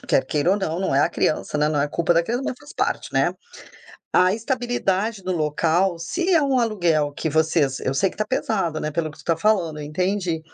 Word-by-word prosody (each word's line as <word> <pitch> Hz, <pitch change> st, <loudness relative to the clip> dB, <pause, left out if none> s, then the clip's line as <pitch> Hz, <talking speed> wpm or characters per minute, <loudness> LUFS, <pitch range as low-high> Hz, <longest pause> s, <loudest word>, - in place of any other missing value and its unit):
quer -, -, +1 dB
queira 150 Hz, +4 st, +1 dB
ou 200 Hz, -, +3 dB
não. 175 Hz, -3 st, -2 dB
Não 190 Hz, -, 0 dB
é 140 Hz, -, +4 dB
a -, -, +3 dB
criança, 150 Hz, -, -1 dB
né, 150 Hz, 0 st, +2 dB
não 150 Hz, -2 st, 0 dB
é 145 Hz, -, +2 dB
culpa 170 Hz, +3 st, +1 dB
da 170 Hz, -, +3 dB
criança, 240 Hz, +9 st, -2 dB
mas -, -, -2 dB
faz 290 Hz, -, -13 dB
parte, -, -, -2 dB
né. -, -, +2 dB, 0.8 s
A 185 Hz, +1 st, +4 dB
estabilidade 225 Hz, -3 st, -1 dB
do 185 Hz, -, -4 dB
local, 165 Hz, +3 st, +1 dB
se 345 Hz, -, -1 dB
é 330 Hz, -, +5 dB
um 275 Hz, -2 st, +2 dB
aluguel 175 Hz, -11 st, +1 dB
que 160 Hz, -, -3 dB
vocês 155 Hz, -3 st, +1 dB
Eu 130 Hz, -, -1 dB
sei 140 Hz, +8 st, +2 dB
que -, -, -14 dB
tá 215 Hz, -, 0 dB
pesado, 195 Hz, -10 st, -1 dB
né, 155 Hz, -, -2 dB
pelo 160 Hz, 0 st, -2 dB
que -, -, -16 dB
tu -, -, -15 dB
tá 165 Hz, -, +1 dB
falando, 170 Hz, -5 st, +1 dB
eu -, -, -6 dB
entendi, 180 Hz, +1 st, -1 dB
175 Hz, 235 wpm, -22 LUFS, 155-210 Hz, 0.8 s, é